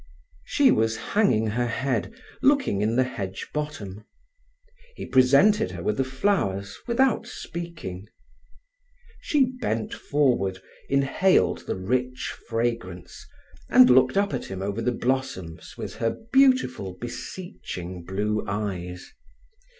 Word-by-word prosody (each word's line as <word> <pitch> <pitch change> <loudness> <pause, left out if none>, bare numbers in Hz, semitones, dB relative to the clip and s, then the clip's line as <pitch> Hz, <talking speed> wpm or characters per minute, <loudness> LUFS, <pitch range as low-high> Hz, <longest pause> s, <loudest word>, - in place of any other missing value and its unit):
She - - +4
was 110 0 +1
hanging 125 - +2
her 120 +3 0
head, 125 - -1 0.3
looking 275 - +3
in 110 +2 +1
the 130 - +4
hedge 95 -7 -5
bottom. 115 -10 -5 0.9
He - - -6
presented 140 +12 +4
her - - -7
with 215 - 0
the 135 - +2
flowers 130 - -1
without 245 0 +2
speaking. 160 - -7 1.1
She 290 -3 +2 0.2
bent 115 - -1
forward, 120 -10 +1 0.3
inhaled 140 +7 +2
the - - -1
rich 125 +7 -2 0.2
fragrance, 115 -6 -3 0.4
and 125 0 +7
looked 130 +5 +5
up 200 0 +2
at - - -3
him 95 0 -5
over 100 +3 -2
the 125 - +1
blossoms 120 -10 -3
with - - -6
her 115 0 -1 0.2
beautiful, 255 - +3
beseeching 95 - -7
blue 105 +4 -1
eyes. 95 -4 -4
120 Hz, 120 wpm, -25 LUFS, 100-150 Hz, 1.1 s, and